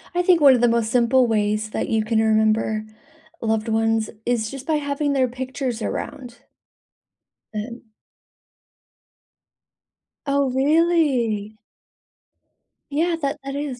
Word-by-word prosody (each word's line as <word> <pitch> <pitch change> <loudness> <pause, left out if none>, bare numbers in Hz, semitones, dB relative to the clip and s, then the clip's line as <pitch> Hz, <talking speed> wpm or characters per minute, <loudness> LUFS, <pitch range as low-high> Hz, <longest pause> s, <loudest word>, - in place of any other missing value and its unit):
I 355 - +3
think 355 -2 +3
one 280 -2 +8
of 245 - +1
the 240 - +5
most 230 -1 0
simple 250 +1 +3
ways 215 -1 0
that - - -3
you 220 -1 +1
can 220 +1 0
remember 220 0 +1 0.6
loved 220 0 -1
ones 225 0 +1 0.2
is 235 -3 0
just 270 +1 -8
by 315 - +2
having 285 0 -1
their 260 -2 +2
pictures 255 -1 -4
around. 250 0 -5 1.2
And 230 +3 -5 2.5
Oh, 280 -1 +1
really? 265 -8 +1 1.3
Yeah, 330 +4 0
that 285 +1 -2
that 275 0 -5
is. 285 -3 -4
245 Hz, 120 wpm, -22 LUFS, 220-280 Hz, 2.5 s, one